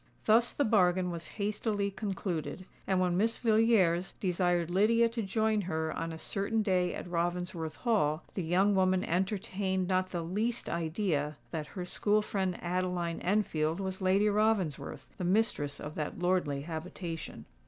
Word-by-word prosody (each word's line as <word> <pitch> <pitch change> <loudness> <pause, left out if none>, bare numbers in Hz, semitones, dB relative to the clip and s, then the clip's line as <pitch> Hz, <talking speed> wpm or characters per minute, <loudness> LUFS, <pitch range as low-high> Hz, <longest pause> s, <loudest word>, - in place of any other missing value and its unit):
Thus 230 +2 +5
the 285 - 0
bargain 185 -4 +3
was 170 -1 -6
hastily 205 -1 -1
concluded; 190 -3 -4 0.2
and 190 -1 +2
when 180 -1 +2
Miss 225 +4 +2
Villiers 215 -6 +3
desired 175 -2 +1
Lydia 225 +5 +4
to 230 0 -3
join 215 +1 +1
her 160 -4 -2
on 165 0 -3
a 160 - -6
certain 205 +6 -1
day 180 -3 +1
at - - -6
Ravensworth 175 -2 -2
Hall, 175 -10 +1
the 190 - -2
young 185 +5 +3
woman 185 -1 +3
entertained 190 0 -1
not 185 0 +1
the 175 -2 -3
least 215 +8 -2
idea 160 -3 -1
that 155 -3 -3
her 180 - -3
school 210 +3 +1
friend 190 -4 -1
Adeline 175 -1 -1
Enfield 170 -4 +1
was 190 0 -4
Lady 190 +3 +3
Ravensworth, 200 -9 0
the - - -2
mistress 180 -7 +1
of 150 - -6
that 150 -1 -4
lordly 175 -6 +1
habitation. 165 +1 -6
185 Hz, 155 wpm, -31 LUFS, 170-205 Hz, 0.2 s, Thus